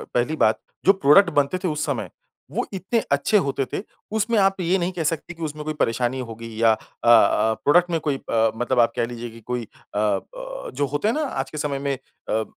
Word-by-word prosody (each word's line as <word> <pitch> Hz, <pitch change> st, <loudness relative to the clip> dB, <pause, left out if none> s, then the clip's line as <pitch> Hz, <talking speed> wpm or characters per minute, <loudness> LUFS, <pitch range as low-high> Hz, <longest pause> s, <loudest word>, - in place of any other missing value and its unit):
पहली 125 Hz, +6 st, +1 dB
बात 110 Hz, -7 st, +3 dB, 0.3 s
जो 195 Hz, -, +7 dB
प्रोडक्ट 180 Hz, +2 st, +5 dB
बनते 145 Hz, +3 st, +1 dB
थे -, -, +1 dB
उस 150 Hz, -2 st, -1 dB
समय -, -, -2 dB, 0.4 s
वो -, -, -1 dB
इतने 195 Hz, +5 st, 0 dB
अच्छे 140 Hz, +9 st, +3 dB
होते 140 Hz, -6 st, 0 dB
थे। -, -, -2 dB, 0.3 s
उसमें 220 Hz, +1 st, +1 dB
आप 195 Hz, 0 st, +3 dB
ये 180 Hz, +2 st, +2 dB
नहीं 180 Hz, 0 st, -1 dB
कह 170 Hz, -, -2 dB
सकते 165 Hz, +3 st, -2 dB
कि 165 Hz, -1 st, -8 dB
उसमें 150 Hz, 0 st, -4 dB
कोई 155 Hz, -, -2 dB
परेशानी 120 Hz, -1 st, 0 dB
होगी 115 Hz, -1 st, -7 dB
या 115 Hz, -1 st, +6 dB
अ -, -, -1 dB, 0.3 s
अ, 115 Hz, -1 st, +5 dB
प्रोडक्ट 175 Hz, +4 st, +4 dB
में 165 Hz, -, +1 dB
कोई 140 Hz, -, +1 dB
अ, 115 Hz, -3 st, +1 dB
मतलब 120 Hz, +2 st, 0 dB
आप 115 Hz, -1 st, +5 dB
कह -, -, +1 dB
लीजिए 120 Hz, 0 st, -6 dB
की 115 Hz, +1 st, -13 dB
कोई 125 Hz, -1 st, -1 dB
अ 105 Hz, -, -12 dB
अ, 105 Hz, -1 st, +1 dB, 0.5 s
जो 145 Hz, +2 st, 0 dB
होते 145 Hz, +8 st, 0 dB
हैं 225 Hz, -, +2 dB
ना 310 Hz, -, 0 dB
आज 135 Hz, -, -3 dB
के 155 Hz, -, -7 dB
समय 145 Hz, -2 st, -2 dB
में 140 Hz, -1 st, -1 dB, 0.3 s
अ, 110 Hz, 0 st, +1 dB
145 Hz, 230 wpm, -23 LUFS, 120-175 Hz, 0.5 s, जो